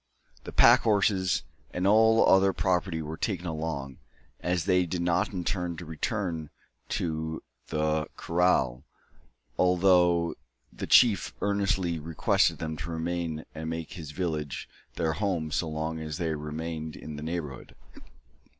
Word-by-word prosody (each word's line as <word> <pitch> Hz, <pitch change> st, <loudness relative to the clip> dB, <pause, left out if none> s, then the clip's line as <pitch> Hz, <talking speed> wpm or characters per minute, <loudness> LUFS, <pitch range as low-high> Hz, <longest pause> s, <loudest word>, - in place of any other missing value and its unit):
The -, -, -6 dB
pack -, -, +7 dB
horses 100 Hz, -4 st, +2 dB, 0.3 s
and 90 Hz, +1 st, -3 dB
all 110 Hz, +2 st, +5 dB
other 95 Hz, 0 st, +5 dB
property 90 Hz, -3 st, 0 dB
were 80 Hz, +1 st, -6 dB
taken 90 Hz, -3 st, -2 dB
along, 80 Hz, -5 st, -4 dB, 0.4 s
as 90 Hz, -1 st, -1 dB
they 90 Hz, -2 st, +3 dB
did 85 Hz, +1 st, -2 dB
not 85 Hz, +1 st, +1 dB
intend 90 Hz, -2 st, -2 dB
to 85 Hz, -, -7 dB
return 80 Hz, -1 st, -3 dB, 0.5 s
to 80 Hz, -1 st, -3 dB, 0.2 s
the 75 Hz, -1 st, 0 dB
kraal, 85 Hz, -8 st, +1 dB, 0.8 s
although 90 Hz, -2 st, +4 dB, 0.4 s
the -, -, -6 dB
chief 105 Hz, -9 st, +5 dB
earnestly 95 Hz, -4 st, 0 dB
requested 80 Hz, +1 st, +1 dB
them 80 Hz, -1 st, -4 dB
to 75 Hz, +4 st, -6 dB
remain 80 Hz, -1 st, -3 dB
and 80 Hz, 0 st, -5 dB
make 80 Hz, -1 st, -5 dB
his 80 Hz, -6 st, -8 dB
village 75 Hz, -3 st, -3 dB, 0.3 s
their 80 Hz, -2 st, 0 dB
home 85 Hz, -4 st, -1 dB
so 80 Hz, +1 st, -1 dB
long 80 Hz, +1 st, -3 dB
as 80 Hz, -1 st, -5 dB
they 85 Hz, -3 st, -1 dB
remained 80 Hz, +1 st, -5 dB
in 75 Hz, -, -8 dB
the 75 Hz, -, -7 dB
neighbourhood. 80 Hz, -4 st, -5 dB
85 Hz, 135 wpm, -28 LUFS, 80-90 Hz, 0.8 s, pack